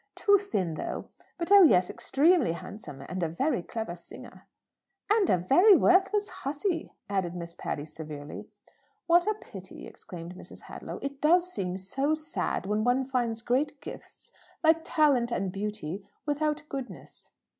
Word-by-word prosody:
Too 405 Hz, -1 st, +4 dB
thin, 195 Hz, -, -2 dB
though. -, -, -5 dB, 0.3 s
But, 345 Hz, +2 st, -4 dB
oh 405 Hz, -1 st, +10 dB
yes; 185 Hz, -, +6 dB
extremely 305 Hz, -, +3 dB
handsome. 170 Hz, -6 st, -9 dB
And 185 Hz, 0 st, -4 dB
a 165 Hz, -, 0 dB
very 225 Hz, -, 0 dB
clever 220 Hz, -1 st, -5 dB
singer." 175 Hz, -, -13 dB, 0.7 s
"And 425 Hz, -4 st, +3 dB
a -, -, +4 dB
very 355 Hz, -, +6 dB
worthless 390 Hz, +4 st, +3 dB
hussey," 320 Hz, +4 st, -3 dB
added 190 Hz, -3 st, -1 dB
Miss 170 Hz, -1 st, -6 dB
Patty 145 Hz, -4 st, -4 dB
severely. 150 Hz, -2 st, -8 dB, 0.6 s
"What 345 Hz, +3 st, +4 dB
a 430 Hz, -, +2 dB
pity!" 195 Hz, -, -11 dB
exclaimed 170 Hz, -1 st, -9 dB
Mrs. 185 Hz, -, -11 dB
Hadlow. -, -, -8 dB
"It 280 Hz, 0 st, -5 dB
does 350 Hz, +3 st, +3 dB
seem 185 Hz, -1 st, -2 dB
so 270 Hz, +11 st, 0 dB
sad 310 Hz, -, -2 dB
when 210 Hz, +2 st, 0 dB
one 250 Hz, +2 st, +2 dB
finds 240 Hz, -3 st, -1 dB
great 275 Hz, +4 st, 0 dB
gifts, -, -, -11 dB, 0.3 s
like 320 Hz, 0 st, +5 dB
talent 275 Hz, -6 st, +3 dB
and 195 Hz, -5 st, -1 dB
beauty, 200 Hz, -2 st, -4 dB, 0.2 s
without 300 Hz, +1 st, 0 dB
goodness!" 270 Hz, -3 st, -8 dB
255 Hz, 150 wpm, -28 LUFS, -, 0.7 s, oh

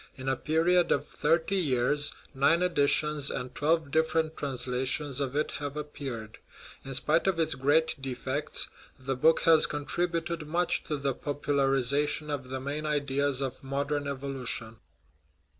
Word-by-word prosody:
In 130 Hz, 0 st, -8 dB
a 135 Hz, -, +2 dB
period 170 Hz, +5 st, +2 dB
of -, -, +2 dB
thirty 170 Hz, +4 st, +1 dB
years 145 Hz, -2 st, +1 dB, 0.2 s
nine 165 Hz, +6 st, +3 dB
editions 150 Hz, -3 st, +2 dB
and 125 Hz, 0 st, -4 dB
twelve 160 Hz, 0 st, +1 dB
different 160 Hz, 0 st, +1 dB
transla 130 Hz, -2 st, -2 dB
tions 140 Hz, 0 st, -2 dB
of 135 Hz, -1 st, -2 dB
it 150 Hz, -, 0 dB
have 145 Hz, 0 st, -5 dB
appeared. 135 Hz, -7 st, -6 dB, 0.4 s
In 135 Hz, 0 st, -5 dB
spite 160 Hz, +7 st, +2 dB
of 190 Hz, -3 st, +2 dB
its 165 Hz, -, +2 dB
great 145 Hz, +3 st, +2 dB
defects, 135 Hz, +2 st, -1 dB, 0.3 s
the 135 Hz, 0 st, -3 dB
book 160 Hz, +6 st, +4 dB
has 160 Hz, -1 st, +6 dB
contributed 165 Hz, +2 st, -2 dB
much 175 Hz, +3 st, +1 dB
to 150 Hz, -, -2 dB
the 140 Hz, -1 st, -1 dB
popularization 145 Hz, +1 st, 0 dB
of 135 Hz, -3 st, -4 dB
the 130 Hz, 0 st, -3 dB
main 145 Hz, +3 st, -4 dB
ideas 140 Hz, -2 st, 0 dB
of 135 Hz, -1 st, -4 dB
modern 140 Hz, +1 st, -2 dB
evolution. 130 Hz, -5 st, -2 dB
145 Hz, 145 wpm, -29 LUFS, 135-155 Hz, 0.4 s, has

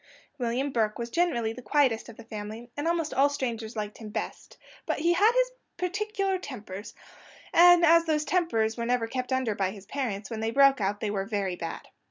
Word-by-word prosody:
William 250 Hz, +4 st, -1 dB
Burke 220 Hz, -4 st, 0 dB
was 235 Hz, 0 st, -5 dB
generally 240 Hz, -10 st, +1 dB
the 250 Hz, -, -9 dB
quietest 255 Hz, -4 st, +1 dB
of 230 Hz, -, -12 dB
the 230 Hz, -, -10 dB
family, 220 Hz, +2 st, -8 dB
and 290 Hz, +3 st, -2 dB
almost 335 Hz, -2 st, 0 dB
all 280 Hz, +2 st, +4 dB
strangers 235 Hz, -5 st, -4 dB
liked 210 Hz, -1 st, -5 dB
him 220 Hz, -2 st, -8 dB
best; -, -, -6 dB, 0.3 s
but -, -, 0 dB
he 335 Hz, +3 st, +2 dB
had 410 Hz, +6 st, +5 dB
his -, -, +3 dB, 0.3 s
particular 390 Hz, +1 st, -1 dB
tempers, 215 Hz, -, -8 dB, 0.6 s
and 350 Hz, 0 st, +7 dB
as 335 Hz, +1 st, +6 dB
those 305 Hz, -2 st, +1 dB
tempers 230 Hz, -13 st, +1 dB
were 235 Hz, -, -2 dB
never 245 Hz, -1 st, +1 dB
kept 255 Hz, +3 st, -4 dB
under 260 Hz, -4 st, +1 dB
by 195 Hz, -2 st, 0 dB
his 195 Hz, 0 st, -10 dB
parents, 220 Hz, -4 st, -4 dB
when 225 Hz, -, -3 dB
they 225 Hz, 0 st, -1 dB
broke 275 Hz, 0 st, +5 dB
out 205 Hz, +1 st, -1 dB
they 210 Hz, -, -1 dB
were 195 Hz, -2 st, -2 dB
very 200 Hz, -4 st, -1 dB
bad. 165 Hz, -1 st, -6 dB
240 Hz, 205 wpm, -28 LUFS, 220-320 Hz, 0.6 s, and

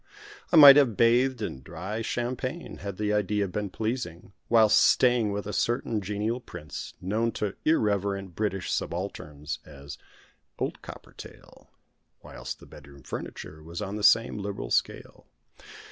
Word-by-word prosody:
I -, -, +3 dB
might 145 Hz, -3 st, +11 dB
have 125 Hz, -8 st, +3 dB
bathed 125 Hz, +3 st, +3 dB
in 65 Hz, -, -5 dB
dry 90 Hz, +10 st, -6 dB
champagne, 125 Hz, +7 st, -4 dB
had 100 Hz, -1 st, -7 dB
the 105 Hz, 0 st, 0 dB
idea 105 Hz, 0 st, 0 dB
been 100 Hz, +2 st, -4 dB
pleasing, 100 Hz, -4 st, -4 dB, 0.2 s
whilst 110 Hz, -2 st, +5 dB
staying 120 Hz, -4 st, +4 dB
with 100 Hz, 0 st, -4 dB
a 105 Hz, -, -5 dB
certain 115 Hz, -2 st, 0 dB
genial 105 Hz, +5 st, -2 dB
prince, 75 Hz, -, -9 dB
known 110 Hz, +5 st, -1 dB
to 105 Hz, -2 st, -3 dB
irreverent 100 Hz, -, 0 dB
British 95 Hz, -2 st, -2 dB
subalterns 80 Hz, -5 st, -4 dB
as 70 Hz, -1 st, -11 dB, 0.6 s
"Old -, -, -3 dB
Coppertail"; -, -, -13 dB, 0.6 s
whilst -, -, -7 dB
the -, -, -14 dB
bedroom 70 Hz, -1 st, -15 dB
furniture 75 Hz, +4 st, -7 dB
was 85 Hz, +2 st, -8 dB
on 100 Hz, 0 st, -4 dB
the 105 Hz, -, -5 dB
same 110 Hz, +1 st, +4 dB
liberal 100 Hz, 0 st, -5 dB
scale. -, -, -2 dB
105 Hz, 140 wpm, -27 LUFS, 90-115 Hz, 0.6 s, might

